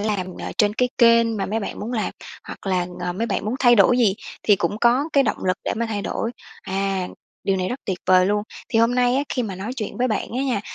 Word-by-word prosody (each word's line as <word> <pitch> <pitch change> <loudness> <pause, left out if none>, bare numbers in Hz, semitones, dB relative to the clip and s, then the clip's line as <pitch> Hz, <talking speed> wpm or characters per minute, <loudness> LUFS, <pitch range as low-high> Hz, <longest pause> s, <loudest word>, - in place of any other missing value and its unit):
làm, 205 -3 -1
ờ, - - -5
trên 210 -1 +3
cái 250 +1 +1
kênh 230 -2 +5
mà 195 - -2
mấy 220 +3 -1
bạn - - -5
muốn 225 +4 -4
làm. 220 -3 -1 0.3
Hoặc - - -10
là, 180 -2 +1
ờ, 180 0 -2
mấy 225 +6 -2
bạn - - -2
muốn 215 +3 -1
thay 240 -2 +6
đổi 235 +4 +5
gì 215 -6 +4 0.3
thì 205 - +4
cũng 190 +4 -2
có 240 +4 +4
cái 275 - +5
động 220 - -2
lực 185 -1 +1
để - - 0
mà 235 +1 -1
thay 210 -2 -3
đổi. 230 - -2 0.3
À, 195 -1 -2 0.4
điều 195 - +1
này 185 -1 -1
rất 255 +3 -4
tuyệt 185 -3 -2
vời 185 0 +5
luôn! 205 +1 +1 0.3
Thì 225 - +1
hôm 230 +2 +3
nay 250 0 +3
á, 280 - +2
khi 250 - -1
mà 205 -5 -4
nói 200 +7 -5
chuyện 215 -5 -4
với 255 - +2
bạn 215 -4 -1
á - - 0
nha, 250 -7 0
215 Hz, 270 wpm, -22 LUFS, 195-240 Hz, 0.4 s, thay